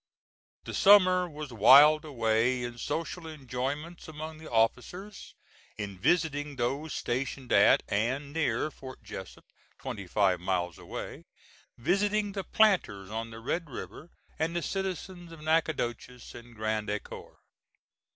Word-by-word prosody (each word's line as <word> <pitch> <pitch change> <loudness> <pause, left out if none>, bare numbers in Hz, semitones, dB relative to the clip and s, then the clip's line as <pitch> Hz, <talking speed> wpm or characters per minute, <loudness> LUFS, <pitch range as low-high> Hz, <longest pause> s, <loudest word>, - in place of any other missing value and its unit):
The - - -7
summer 185 -3 +6
was 150 -4 -8
whiled 145 +8 +7
away 120 -2 +1
in 120 0 -6
social 165 +4 -4
enjoyments 145 +3 -5
among 155 0 -7
the 160 - -10
officers, 130 - -1 0.4
in 100 -3 -6
visiting 150 - +1
those 135 +5 -2
stationed 130 +1 -3
at, - - +6
and 130 +8 -1
near, 155 -2 0
Fort 130 -4 -11
Jessup, 100 -3 -9 0.3
twenty 100 -3 -6
five 95 -1 +2
miles 90 -1 -2
away, - - -7 0.5
visiting 205 - +1
the 195 -1 -4
planters 175 - +2
on 115 +1 -4
the 115 0 -9
Red 160 +7 -3
River, 145 +5 -8 0.3
and 165 +2 -1
the 170 - -1
citizens 185 -1 -4
of 165 -2 -11
Natchitoches 135 -6 -1
and 120 0 -12
Grand 110 -1 -2
Ecore. 105 0 -6
140 Hz, 130 wpm, -29 LUFS, 115-165 Hz, 0.5 s, whiled